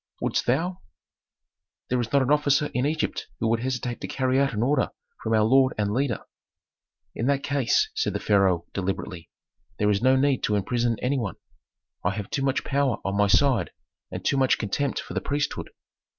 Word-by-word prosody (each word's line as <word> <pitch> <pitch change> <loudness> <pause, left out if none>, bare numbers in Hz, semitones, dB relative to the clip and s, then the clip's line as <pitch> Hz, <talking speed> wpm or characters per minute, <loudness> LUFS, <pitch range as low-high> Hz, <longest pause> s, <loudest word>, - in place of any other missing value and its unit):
"Wouldst - - -1
thou?" 170 +9 0 1.1
"There 125 -1 +2
is 115 - -4
not 140 -1 +4
an 130 - 0
officer 150 0 +2
in 125 +3 +1
Egypt 155 +1 -2
who 115 - 0
would 115 0 +2
hesitate 125 -1 -3
to - - -4
carry 130 0 +1
out 140 0 +2
an 110 0 -1
order 140 +4 +2 0.3
from 115 - 0
our 110 - +4
lord 130 +4 +4
and 105 -1 0
leader." 130 -2 -1 0.9
"In 115 - -2
that 140 -1 +1
case," 140 -4 +1
said - - -1
the - - -2
pharaoh, 95 -5 +2
deliberately, 90 -3 -4 0.5
"there 105 0 +2
is 100 - +1
no 130 +2 +5
need 135 0 +2
to 105 - +1
imprison 115 +3 0
any 135 +2 +1
one. 105 -5 -3 0.7
I 95 +2 0
have 105 -1 -6
too 135 - -1
much 135 -1 0
power 140 -4 +1
on 100 0 -1
my 105 0 +3
side 120 +3 +3 0.4
and - - -7
too 140 - +2
much 130 -1 +3
contempt 130 +6 -1
for - - -7
the - - -1
priesthood. 145 0 -2
125 Hz, 195 wpm, -25 LUFS, 105-140 Hz, 1.1 s, no